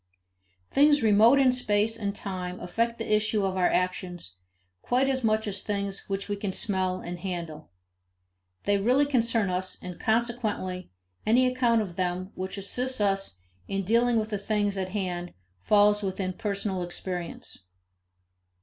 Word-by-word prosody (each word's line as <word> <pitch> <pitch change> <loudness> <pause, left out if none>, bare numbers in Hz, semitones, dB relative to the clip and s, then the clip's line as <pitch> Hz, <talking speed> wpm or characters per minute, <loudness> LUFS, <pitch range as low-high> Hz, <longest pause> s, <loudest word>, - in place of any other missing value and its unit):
Things 290 -1 +5
remote 220 +5 +6
in 265 -2 +5
space 220 -3 +1
and 205 -3 -3
time 185 -2 -5
affect 230 +6 -1
the 225 -1 -1
issue 210 -1 +1
of 190 -1 -1
our 180 -1 +3
actions 180 - -2 0.5
quite 255 +2 +1
as 260 -2 0
much 220 0 +2
as 200 -1 -2
things 200 -1 -3
which 195 0 -2
we 205 - -1
can 200 -1 -3
smell 185 -3 0
and 175 0 -6
handle. 170 -4 -5 0.9
They 200 0 +2
really 255 +8 +3
concern 230 -7 +1
us, 185 +1 -2
and, 180 -1 -8
consequently, 220 -5 -1 0.3
any 245 +4 +4
account 245 -3 +2
of 175 -4 -9
them 185 +1 -2
which 190 +2 -5
assists 250 +6 -2
us 195 - 0 0.3
in 195 0 -2
dealing 235 +4 +3
with 220 0 -1
things 205 -1 0
at 190 -1 -2
hand 180 -3 -3 0.2
falls 205 - +4
within 190 -1 -2
personal 200 -1 -2
experience. 175 0 -6
200 Hz, 150 wpm, -27 LUFS, 185-225 Hz, 0.9 s, remote